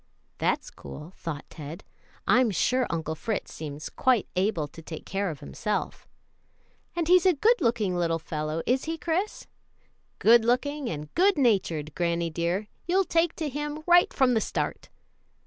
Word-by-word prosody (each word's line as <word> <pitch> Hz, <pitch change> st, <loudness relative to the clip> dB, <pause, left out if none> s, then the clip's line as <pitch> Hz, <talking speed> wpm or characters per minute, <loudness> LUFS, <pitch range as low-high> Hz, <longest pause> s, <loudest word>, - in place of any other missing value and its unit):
"That's -, -, 0 dB
cool," 150 Hz, -, -10 dB
thought 155 Hz, -4 st, -5 dB
Ted; 155 Hz, +4 st, -8 dB, 0.4 s
"I'm 245 Hz, +3 st, +4 dB
sure 250 Hz, +6 st, +1 dB
Uncle 160 Hz, -2 st, -2 dB
Fritz 210 Hz, +6 st, -3 dB
seems 150 Hz, 0 st, -6 dB
quite 255 Hz, -6 st, +2 dB
able 180 Hz, -5 st, +1 dB
to 165 Hz, -, -12 dB
take 160 Hz, 0 st, -8 dB
care 195 Hz, 0 st, -1 dB
of 150 Hz, -4 st, -7 dB
himself." 210 Hz, -, -3 dB, 0.9 s
"And 340 Hz, -2 st, -1 dB
he's 365 Hz, +1 st, +6 dB
a 365 Hz, -, +5 dB
good 455 Hz, -, +3 dB
looking 220 Hz, -6 st, +1 dB
little 170 Hz, -2 st, +1 dB
fellow, 155 Hz, 0 st, -3 dB
is 260 Hz, +2 st, +1 dB
he, 325 Hz, +1 st, -2 dB
Chris?" 355 Hz, +6 st, -2 dB, 0.7 s
"Good 235 Hz, +1 st, +6 dB
looking 275 Hz, +3 st, 0 dB
and 150 Hz, -1 st, -6 dB
good 385 Hz, +1 st, +4 dB
natured, 185 Hz, -, +1 dB
granny 170 Hz, -1 st, 0 dB
dear; 175 Hz, +5 st, -1 dB, 0.2 s
you'll 375 Hz, +2 st, +3 dB
take 335 Hz, 0 st, +1 dB
to 315 Hz, -, -2 dB
him 295 Hz, +2 st, -4 dB
right 350 Hz, 0 st, +6 dB
from 260 Hz, -3 st, +3 dB
the 220 Hz, -, +2 dB
start." -, -, -3 dB
215 Hz, 160 wpm, -27 LUFS, -, 0.9 s, he's